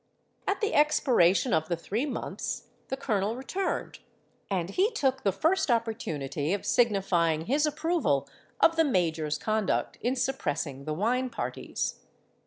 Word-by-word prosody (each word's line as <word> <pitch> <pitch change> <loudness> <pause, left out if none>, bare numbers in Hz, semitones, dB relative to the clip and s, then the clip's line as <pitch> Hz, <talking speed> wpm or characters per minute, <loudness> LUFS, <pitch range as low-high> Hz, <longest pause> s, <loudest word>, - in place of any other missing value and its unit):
"At 400 - 0
the 425 - 0
expiration 255 - +4
of 160 +1 +1
the 170 - 0
three 220 - -2
months 265 - -4 0.2
the 265 - -3
colonel 215 -4 0
returned; 370 +10 -3 0.5
and 185 -2 -1
he 385 - +3
took 265 - 0
the 195 - +2
first 320 - +1
opportunity 160 - -1
of 205 - -7
signifying 180 -8 +2
his 290 - +2
approval 300 - 0 0.3
of 330 0 +4
the 325 - +6
major's 165 - 0
conduct 215 -2 -1
in 245 +3 0
suppressing 150 - -2
the 155 - -2
wine 250 +8 +1
parties. 230 - -4
220 Hz, 140 wpm, -28 LUFS, 165-270 Hz, 0.5 s, the